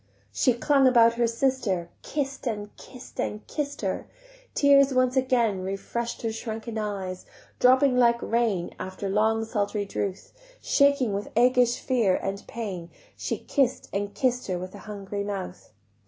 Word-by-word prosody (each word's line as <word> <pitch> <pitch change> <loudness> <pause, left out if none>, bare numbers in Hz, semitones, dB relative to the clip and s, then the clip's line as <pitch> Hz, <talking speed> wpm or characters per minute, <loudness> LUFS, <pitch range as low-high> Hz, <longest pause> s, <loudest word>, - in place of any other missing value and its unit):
She 255 - +3
clung 270 +3 +3
about 235 -2 +6
her 235 0 +1
sister, 230 -8 0
Kiss'd 275 -3 -3
and 210 -2 -4
kiss'd 255 -1 -13
and 210 +1 -3
kiss'd 285 -1 -4
her: - - -2 0.5
Tears 275 -1 +5
once 255 0 +3
again 240 -7 +2
Refresh'd 195 +6 -4
her 225 - 0
shrunken 220 0 -5
eyes, 195 -3 -4 0.3
Dropping 260 +1 +5
like 235 -1 +4
rain 225 -7 0
After 190 +1 -5
long 220 +3 +2
sultry 210 -2 -1
drouth; 195 -1 -4 0.3
Shaking 280 -6 +3
with 200 +1 -3
aguish 245 0 +4
fear, 230 -8 +2
and 195 +1 -3
pain, 190 -7 -5 0.3
She - - -3
kiss'd 265 -3 0
and 200 0 -2
kiss'd 250 +3 0
her 185 -2 -1
with 185 +1 -7
a 205 - -10
hungry 200 0 -4
mouth. 195 - -6
225 Hz, 150 wpm, -26 LUFS, 200-255 Hz, 0.5 s, about